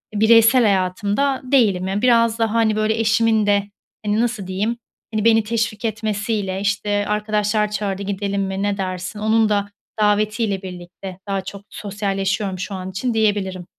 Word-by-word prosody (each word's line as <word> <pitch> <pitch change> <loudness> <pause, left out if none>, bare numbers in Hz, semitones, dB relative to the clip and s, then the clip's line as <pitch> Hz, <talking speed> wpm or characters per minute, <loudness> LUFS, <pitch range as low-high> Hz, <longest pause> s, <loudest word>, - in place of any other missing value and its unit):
E, - - -1
bireysel 230 +3 +6
hayatımda 205 +7 +1
değilim. 215 -9 +2
Ya, 195 +2 -1
biraz 230 -2 +3
da, 225 -1 +1
hani, 225 -2 +2
böyle, 215 +1 0
eşimin 220 0 +3
de, 200 -1 +3 0.4
hani, 210 +2 +1
nasıl 230 -5 -2
diyeyim, 205 +5 -1 0.4
hani, 215 0 -1
beni 225 -1 +5
teşvik 225 0 -2
etmesiyle, 210 -3 -2
işte, 205 0 0
"Arkadaşlar 210 0 0
çağırdı, 200 -2 -2
gidelim 200 0 -2
mi, 190 +1 -3
ne 205 -1 0
dersin?" 185 +1 -4
Onun 220 0 +2
da 205 -1 0 0.3
davetiyle 210 -1 +1
birlikte 180 0 -9
daha 195 -1 -1
çok 195 +1 -8
sosyalleşiyorum 195 -1 -2
şu 195 +2 -4
an 185 0 -6
için, 240 +6 -2
diyebilirim. 200 -4 0
210 Hz, 155 wpm, -20 LUFS, 195-220 Hz, 0.4 s, bireysel